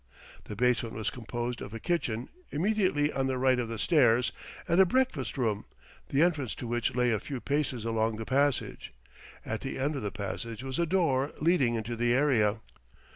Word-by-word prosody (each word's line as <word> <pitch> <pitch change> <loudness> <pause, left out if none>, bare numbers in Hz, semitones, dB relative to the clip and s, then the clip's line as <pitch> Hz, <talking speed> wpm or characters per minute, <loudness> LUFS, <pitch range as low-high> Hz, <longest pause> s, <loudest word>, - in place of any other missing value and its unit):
The 105 - -7
basement 120 0 +1
was 110 +1 -2
composed 120 0 -4
of 105 - -7
a - - -5
kitchen, 125 -9 -1 0.2
immediately 175 -4 +1
on 135 -1 0
the 130 -1 -1
right 130 0 +3
of 120 - -1
the 115 - -4
stairs, 120 - +3 0.4
and 175 +2 +5
a - - +9
breakfast 185 - 0
room, 110 -5 0 0.4
the 140 +4 +3
entrance 145 -10 0
to - - -7
which 120 0 -1
lay 125 -1 +3
a 110 - +1
few 135 +3 -5
paces 140 -4 -1
along 115 -1 0
the 110 +1 -5
passage. 140 +1 0 0.5
At 110 - -3
the 135 - -4
end 145 +3 0
of 135 - -3
the 105 - -2
passage 115 +3 -5
was 135 +2 -3
a 170 - +2
door 155 -6 +1
leading 150 -7 +3
into 115 +1 -3
the 120 +1 +2
area. 115 -6 +2
125 Hz, 190 wpm, -29 LUFS, 115-145 Hz, 0.5 s, a